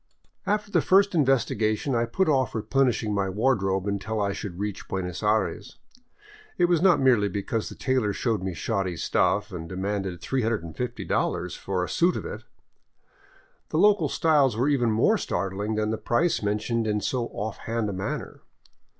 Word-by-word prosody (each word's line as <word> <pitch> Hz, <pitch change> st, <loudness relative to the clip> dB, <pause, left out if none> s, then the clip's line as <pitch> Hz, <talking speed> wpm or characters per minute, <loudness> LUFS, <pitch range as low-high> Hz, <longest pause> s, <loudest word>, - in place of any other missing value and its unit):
After 210 Hz, 0 st, 0 dB
the -, -, +3 dB
first 200 Hz, +1 st, +4 dB
investigation 130 Hz, -5 st, +1 dB
I 115 Hz, 0 st, +2 dB
put 185 Hz, +12 st, 0 dB
off 135 Hz, -5 st, +1 dB
replenishing 115 Hz, -2 st, +1 dB
my 100 Hz, -1 st, 0 dB
wardrobe 95 Hz, -3 st, +1 dB
un 100 Hz, -1 st, -1 dB
til 110 Hz, +3 st, -3 dB
I 100 Hz, -1 st, 0 dB
should 95 Hz, -3 st, -6 dB
reach 105 Hz, 0 st, -4 dB
Buenos 90 Hz, -2 st, -4 dB
Aires. 105 Hz, -1 st, -1 dB, 0.8 s
It 175 Hz, -, +4 dB
was 175 Hz, -2 st, +2 dB
not 185 Hz, -3 st, +5 dB
merely 120 Hz, -6 st, +3 dB
because 100 Hz, +3 st, -3 dB
the -, -, -10 dB
tailor 130 Hz, -6 st, 0 dB
showed 110 Hz, -1 st, -1 dB
me 95 Hz, -2 st, -3 dB
shoddy 95 Hz, -5 st, -2 dB
stuff 105 Hz, +5 st, +1 dB
and 85 Hz, -3 st, -7 dB
demanded 95 Hz, -1 st, -3 dB
$350 110 Hz, -5 st, -2 dB
for 95 Hz, -2 st, -2 dB
a -, -, -3 dB
suit 175 Hz, +1 st, +2 dB
of -, -, -4 dB
it! -, -, -6 dB, 1.3 s
The -, -, -1 dB
local 210 Hz, 0 st, +4 dB
styles 145 Hz, -, +3 dB
were 125 Hz, +4 st, +2 dB
even 125 Hz, -5 st, +2 dB
more 110 Hz, 0 st, +3 dB
startling 100 Hz, +4 st, -2 dB
than 110 Hz, 0 st, 0 dB
the 110 Hz, -, -2 dB
price 165 Hz, +8 st, +1 dB
mentioned 110 Hz, +2 st, -1 dB
in 105 Hz, -1 st, 0 dB
so 120 Hz, +3 st, -1 dB
off 105 Hz, +1 st, -5 dB
hand 115 Hz, -1 st, -2 dB
a 100 Hz, -, -3 dB
manner. 95 Hz, +1 st, -5 dB
110 Hz, 165 wpm, -26 LUFS, 100-130 Hz, 1.3 s, not